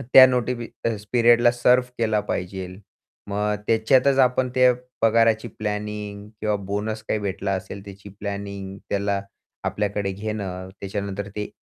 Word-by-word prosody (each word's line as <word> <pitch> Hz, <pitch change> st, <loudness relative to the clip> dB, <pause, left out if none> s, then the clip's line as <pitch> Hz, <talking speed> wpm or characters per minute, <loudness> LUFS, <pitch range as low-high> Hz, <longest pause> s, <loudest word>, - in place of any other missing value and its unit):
त्या 130 Hz, +1 st, +8 dB
नोटीपी 125 Hz, -1 st, -1 dB, 0.5 s
पिरियडला 120 Hz, 0 st, +6 dB
सर्व्ह 125 Hz, +1 st, +3 dB
केला 110 Hz, -2 st, +2 dB
पाहिजेल. 90 Hz, 0 st, -4 dB, 0.5 s
मग 105 Hz, +1 st, 0 dB
त्याच्यातच 130 Hz, +5 st, +4 dB
आपण 125 Hz, 0 st, +4 dB
ते 125 Hz, -1 st, +6 dB, 0.3 s
पगाराची 115 Hz, 0 st, +4 dB
प्लॅनिंग 105 Hz, -1 st, -4 dB
किंवा 105 Hz, -1 st, +1 dB
बोनस 105 Hz, +2 st, -3 dB
काही 110 Hz, -, +1 dB
भेटला 100 Hz, 0 st, -2 dB
असेल 95 Hz, +1 st, -6 dB
त्याची 100 Hz, 0 st, -11 dB
प्लॅनिंग 100 Hz, -1 st, -5 dB
त्याला 100 Hz, 0 st, 0 dB, 0.4 s
आपल्याकडे 100 Hz, -1 st, -1 dB
घेणं, 95 Hz, -3 st, -4 dB
त्याच्यानंतर 100 Hz, 0 st, -4 dB
ते 105 Hz, 0 st, -3 dB
105 Hz, 125 wpm, -24 LUFS, 100-115 Hz, 0.5 s, त्या